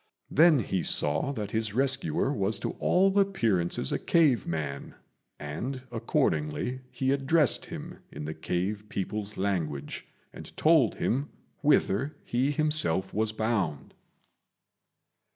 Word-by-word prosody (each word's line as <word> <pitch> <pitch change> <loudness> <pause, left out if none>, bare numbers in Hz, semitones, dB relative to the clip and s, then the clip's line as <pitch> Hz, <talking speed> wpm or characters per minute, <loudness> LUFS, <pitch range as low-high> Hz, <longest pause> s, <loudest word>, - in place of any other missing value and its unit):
Then 160 +1 +6
he 95 -6 -1
saw 75 - +1
that 105 -5 -5
his 110 -2 -2
rescuer 135 +1 +1
was 100 -3 0
to 100 - -3
all 195 +2 +3
appearances 110 - +1
a - - 0
cave 150 - +2
man, 75 -4 -4 0.4
and 115 - -5
accordingly 80 - -1
he 130 +1 -1
addressed 140 +1 +2
him - - -8
in 75 - -7
the 80 - -4
cave 90 +6 -3
people's 105 +1 -4
language, 85 -8 -3 0.3
and - - -11
told 155 -7 +4
him 140 +5 -1 0.3
whither 145 -2 +2
he 125 +3 0
himself 145 - +1
was 110 +1 +1
bound. 110 -9 -2
110 Hz, 120 wpm, -28 LUFS, 90-140 Hz, 0.4 s, Then